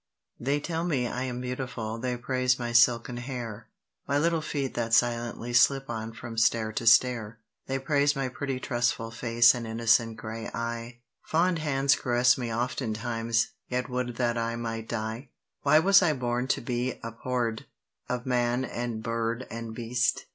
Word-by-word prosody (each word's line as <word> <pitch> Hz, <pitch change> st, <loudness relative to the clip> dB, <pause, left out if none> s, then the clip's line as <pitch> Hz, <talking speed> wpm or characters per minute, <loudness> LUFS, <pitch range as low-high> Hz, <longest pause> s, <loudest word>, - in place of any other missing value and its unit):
THEY 140 Hz, +4 st, 0 dB
tell 165 Hz, +2 st, -3 dB
me 140 Hz, -8 st, 0 dB
I 125 Hz, +2 st, -3 dB
am 125 Hz, -1 st, -4 dB
beautiful: 125 Hz, -3 st, -4 dB
they 125 Hz, 0 st, -2 dB
praise 125 Hz, +1 st, +1 dB
my 120 Hz, -1 st, -3 dB
silken 120 Hz, 0 st, +4 dB
hair, 120 Hz, -3 st, -6 dB, 0.4 s
My 140 Hz, -, +1 dB
little 165 Hz, +2 st, +2 dB
feet 140 Hz, -3 st, -3 dB
that 115 Hz, -1 st, +1 dB
silently 120 Hz, 0 st, 0 dB
slip 135 Hz, +2 st, +4 dB
on 110 Hz, 0 st, -4 dB
from 115 Hz, 0 st, -5 dB
stair 115 Hz, -1 st, +2 dB
to 115 Hz, -, -3 dB
stair: 115 Hz, -1 st, +4 dB, 0.3 s
They 135 Hz, -, -1 dB
praise 145 Hz, +1 st, +2 dB
my 135 Hz, -2 st, -1 dB
pretty 130 Hz, +1 st, -4 dB
trustful 120 Hz, -2 st, -1 dB
face 115 Hz, 0 st, +4 dB
and 120 Hz, -2 st, -5 dB
innocent 115 Hz, 0 st, +2 dB
grey 110 Hz, +1 st, -6 dB
eye; 115 Hz, +1 st, -5 dB, 0.2 s
Fond 170 Hz, +1 st, +1 dB
hands 140 Hz, -2 st, +2 dB
caress 125 Hz, -1 st, +3 dB
me 120 Hz, -3 st, -4 dB
oftentimes, 115 Hz, -1 st, -1 dB, 0.2 s
yet 125 Hz, +1 st, -2 dB
would 125 Hz, -1 st, -2 dB
that 120 Hz, -1 st, 0 dB
I 115 Hz, 0 st, -1 dB
might 115 Hz, -1 st, -4 dB
die! 115 Hz, +3 st, -4 dB, 0.3 s
Why 145 Hz, +2 st, +5 dB
was 195 Hz, +5 st, +6 dB
I 165 Hz, -4 st, +3 dB
born 125 Hz, -1 st, -1 dB
to -, -, 0 dB
be 125 Hz, +1 st, -2 dB
abhorr'd 115 Hz, 0 st, -3 dB, 0.4 s
of 125 Hz, -1 st, -2 dB
man 125 Hz, 0 st, +1 dB
and 120 Hz, -3 st, -4 dB
bird 115 Hz, +2 st, -2 dB
and 115 Hz, -1 st, -6 dB
beast? 120 Hz, +1 st, 0 dB
120 Hz, 165 wpm, -28 LUFS, 115-130 Hz, 0.4 s, was